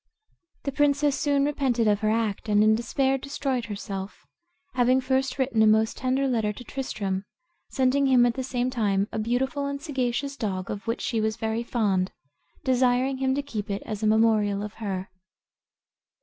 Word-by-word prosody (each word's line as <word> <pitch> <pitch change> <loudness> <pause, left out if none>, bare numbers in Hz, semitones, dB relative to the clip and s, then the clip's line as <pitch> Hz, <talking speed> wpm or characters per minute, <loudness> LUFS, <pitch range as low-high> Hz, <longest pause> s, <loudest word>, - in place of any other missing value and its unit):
The 280 - -2
princess 290 0 +2
soon 280 -1 +1
repented 260 -6 +1
of 205 -1 +3
her 215 0 +1
act, 220 -1 -1
and 210 0 +4
in 215 0 +5
despair 265 +4 +1
destroyed 270 -3 -2
herself, 200 -2 -6 0.5
having 255 +1 +3
first 265 +1 0
written 260 -4 +1
a 220 - +6
most 220 +1 +3
tender 260 +2 0
letter 225 -5 +1
to 210 - -9
Tristram, 200 -7 -3 0.5
sending 270 +1 +2
him 250 -2 +5
at 240 - +2
the 260 - -4
same 250 -1 -1
time 205 -4 +1
a - - -3
beautiful 265 +6 -1
and 280 0 -3
sagacious 275 -2 -2
dog, 190 -6 -3
of 205 +3 -6
which 230 - -1
she 225 -2 -1
was 220 0 -1
very 225 0 -1
fond, 200 -6 0 0.5
desiring 255 +1 +2
him 265 0 +1
to 285 - -1
keep 220 -7 -5
it 200 0 -3
as 215 -1 -5
a 215 - +1
memorial 215 -2 +3
of 210 0 -6
her. 190 -3 -4
240 Hz, 175 wpm, -26 LUFS, 215-265 Hz, 0.5 s, a